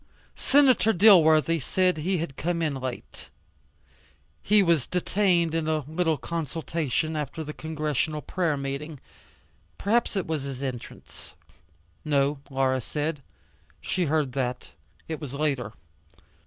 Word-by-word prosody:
Senator 265 -5 +4
Dilworthy 165 -5 +6
said 180 +5 +1
he 180 +5 0
had 155 -5 -4
come 170 +2 -1
in 155 -3 0
late. 130 -2 -7 1.1
He 210 -1 +4
was 170 -7 +2
detained 180 -2 +1
in 165 -1 -1
a 155 -3 0
little 160 0 0
consultation 160 -1 -2
after 150 +1 -4
the 150 0 -7
Congressional 155 -1 -2
prayer 170 -5 -1
meeting. 140 +2 -5 0.8
Perhaps 225 +2 +1
it 195 - -1
was 160 -2 -2
his 135 -1 -6
entrance. 125 - -8 0.7
No, 140 -1 +1
Laura 130 -1 +1
said. 150 +4 -3 0.6
She 185 -2 -1
heard 150 -3 0
that. 125 -1 -3 0.4
It 160 -1 -5
was 140 -2 -6
later. 140 -7 -1
155 Hz, 125 wpm, -26 LUFS, 140-170 Hz, 1.1 s, Dilworthy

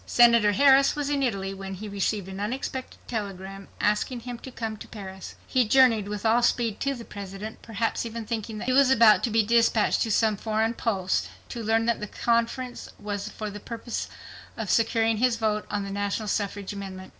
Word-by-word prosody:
Senator 235 -3 +5
Harris 275 +5 +5
was 290 -1 -2
in 285 -1 +1
Italy 195 -7 -1
when 195 0 -6
he 210 +3 -7
received 200 -1 -1
an 190 0 -7
unexpected 255 +4 -4
telegram 195 -3 -5
asking 210 +4 0
him 245 0 -7
to 260 - -9
come 225 -3 -4
to - - -10
Paris. 190 -3 -9
He 255 -4 +2
journeyed 230 -4 +5
with 210 +1 -5
all 225 +2 +4
speed 235 -3 +1
to 275 0 -1
the 235 -2 -9
President, 200 +2 -8
perhaps 225 0 -2
even 230 -1 -5
thinking 220 0 -4
that - - -5
he 255 - +1
was 275 0 +5
about 230 -4 +6
to - - -2
be 225 0 +3
dispatched 230 0 +3
to 225 - +1
some 215 -1 +2
foreign 220 +2 0
post, 185 - -1 0.2
to 235 - -5
learn 225 +1 +2
that 235 -1 +1
the 210 - -5
conference 235 +3 -1
was 205 0 -4
for 215 -1 -6
the 205 - -8
purpose 230 +2 -5 0.5
of 220 -4 -2
securing 225 -1 +2
his 250 +1 +2
vote 215 -2 -1
on 205 -1 -2
the 200 - -6
national 205 +2 -2
suffrage 205 -1 -2
amendment. 190 -2 -7
220 Hz, 200 wpm, -26 LUFS, 205-235 Hz, 0.5 s, about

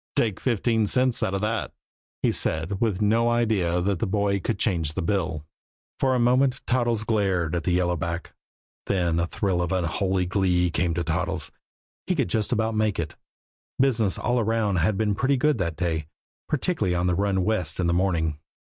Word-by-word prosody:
"Take 110 -5 +1
fifteen 115 -2 +1
cents 125 +2 +3
out 95 - 0
of 95 - -2
that," 110 +1 -2 0.5
he - - +3
said, 80 +5 0
with 105 -3 +1
no 115 +3 +3
idea 105 -7 +1
that 100 -2 0
the 110 - -1
boy 100 0 +1
could 95 - -2
change 80 -9 0
the - - -2
bill. 80 -5 -1 0.5
For 130 -1 +2
a - - +1
moment 130 +2 +2
Toddles 120 -3 +1
glared 95 -7 0
at 85 - -3
the 90 - +1
yellow 90 0 +1
back, 85 +1 -4 0.5
then 85 -4 +1
a 85 - 0
thrill 95 -1 -1
of 90 - -2
unholy 95 +1 0
glee 90 -2 +1
came 85 0 0
to 85 - -1
Toddles. 85 0 -2 0.6
He - - +1
could - - 0
just 110 +3 -1
about 110 -1 0
make 110 -2 0
it, 80 -2 -3 0.7
business 115 -7 +2
all 125 0 0
around 110 -3 +1
had 95 +5 +1
been 105 -1 +1
pretty 135 +6 +1
good 150 -1 +2
that 85 -4 -2
day, 80 -4 -2 0.4
particularly 145 - 0
on 90 +1 0
the 90 - +2
run 95 0 +1
west 90 -6 0
in 90 - +1
the 85 - +2
morning. 85 -4 0
95 Hz, 190 wpm, -25 LUFS, 85-110 Hz, 0.7 s, cents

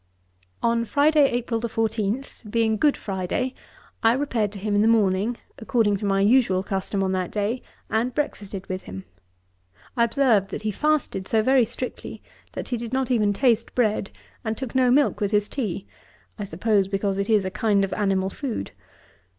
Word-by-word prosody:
On 230 0 +2
Friday, 290 +3 +4
April 240 -1 -2
14, 225 +1 -1 0.3
being 225 0 +2
Good 290 +6 +2
Friday, 195 +7 -2 0.5
I 225 0 +5
repaired 245 -6 0
to - - -7
him 205 +1 -2
in 205 - +3
the 220 - +4
morning, 215 +1 +2 0.2
according 220 -4 +1
to 205 - -5
my 195 0 +2
usual 205 -4 +3
custom 195 0 -2
on 190 - 0
that 185 -2 -1
day, 215 +4 -2 0.3
and 230 +3 0
breakfasted 205 -9 -4
with 185 0 -5
him. 95 +1 -8 0.9
I 235 - +3
observed 230 -5 +2
that - - -6
he 215 - 0
fasted 290 -7 0
so 220 -1 +2
very 260 0 +4
strictly, 250 +2 -7 0.3
that - - -6
he 245 - -1
did 235 +1 -6
not 260 0 0
even 215 -4 +3
taste 230 +1 +1
bread, 215 -5 +1 0.3
and 220 -1 -2
took 260 -3 -5
no 260 -1 +3
milk 275 -2 +3
with 205 - +1
his 210 0 +1
tea; 205 -8 -3 0.5
I 205 - -3
suppose 195 +2 +1
because 195 0 -1
it 200 - -2
is 210 -3 +3
a 185 - -2
kind 210 -1 +2
of 195 - -6
animal 195 -2 0
food. 240 - -4
220 Hz, 180 wpm, -24 LUFS, 195-245 Hz, 0.9 s, I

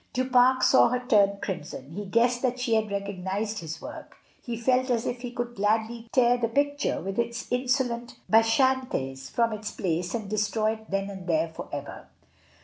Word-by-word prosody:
Du 255 0 0
Pare 255 0 +5
saw 260 - +6
her 250 +1 -2
turn 200 -5 +4
crimson; 150 -7 -5
he 205 +5 -5
guessed 240 +4 +2
that 255 -1 0
she 245 -2 0
had 220 -1 +2
recognised 200 +2 -3
his 160 -2 -6
work; - - -10 0.2
he 235 -2 -5
felt 255 +2 +2
as 235 -2 +1
if 245 0 -3
he 245 - -4
could 240 0 -4
gladly 220 +2 0
tear 245 -1 +4
the 230 - +1
picture 285 +4 0
with 195 +3 -4
its 235 0 -2
insolent 250 -1 0
Bacchantes 225 - +2
from 230 -2 +1
its 215 0 -5
place 175 0 -2
and 220 -3 -4
destroy 215 +1 0
it 220 0 -9
then 195 0 -1
and 190 -2 -9
there 165 -1 +1
for 160 - -9
ever. 145 0 -7
225 Hz, 185 wpm, -27 LUFS, 200-245 Hz, 0.2 s, saw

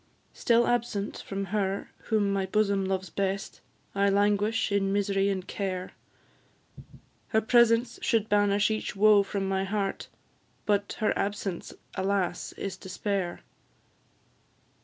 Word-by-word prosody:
Still 235 -1 +3
absent 230 -4 -1
from 195 0 -4
her 200 -1 -1
whom 205 -3 +1
my 195 -1 0
bosom 200 -1 +1
loves 190 -2 -2
best, 195 +1 -2 0.3
I 200 0 +2
languish 205 +2 +2
in 195 -1 +1
mis'ry 200 0 +1
and 190 -2 -2
care; 185 -2 -3 1.4
Her 220 - +2
presence 235 +1 +3
could 225 -3 +1
banish 205 0 +3
each 215 -1 -3
woe 210 0 +6
from 195 0 -3
my 190 0 0
heart, 195 0 -2 0.6
But 205 -1 +1
her 215 - +2
absence, 200 -3 -3 0.2
alas! 190 -2 -1
is 195 - -5
despair. 190 -1 -3
200 Hz, 120 wpm, -28 LUFS, 195-210 Hz, 1.4 s, woe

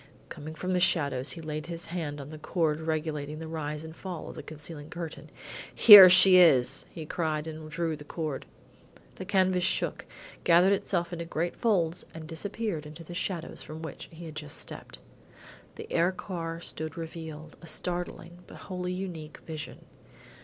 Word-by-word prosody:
Coming 155 +2 -8
from 185 +3 -2
the 180 - +2
shadows, 140 -6 +1
he 165 - -8
laid 155 0 -5
his 170 -1 -5
hand 160 -4 -4
on 140 +2 -8
the 155 - -9
cord 155 -1 0
regulating 155 -2 -3
the 160 0 -7
rise 150 -1 -4
and 160 0 -9
fall 180 -3 -7
of - - -8
the - - -6
concealing 150 0 -9
curtain. 170 -2 -7 0.5
"Here 205 -5 +12
she 185 +1 +9
is!" 135 -9 +5
he 160 - -8
cried 155 -1 -2
and 155 -1 -7
drew 165 +1 -2
the 150 - -11
cord. 150 -2 -5 0.7
The 185 - -6
canvas 185 -2 +2
shook, - - 0 0.4
gathered 180 +3 +5
itself 175 -3 -1
into 170 -1 -4
great 165 +1 -2
folds 180 -7 +1
and 160 -1 -7
disappeared 170 0 -4
in 150 - -11
the 165 +1 -10
shadows 175 -1 -4
from 160 +1 -9
which 160 - -8
he 170 +1 -10
had 160 - -8
just 150 -1 -6
stepped. - - -8 0.8
The - - -8
air 170 +2 +3
car 170 -3 -5
stood 160 -2 -5
revealed 160 -1 -8
a 170 - -11
startling, 175 +1 -4
because - - -12
wholly 180 -1 -4
unique, 170 -5 -6
vision. 155 -2 -7
165 Hz, 175 wpm, -28 LUFS, 155-175 Hz, 0.8 s, Here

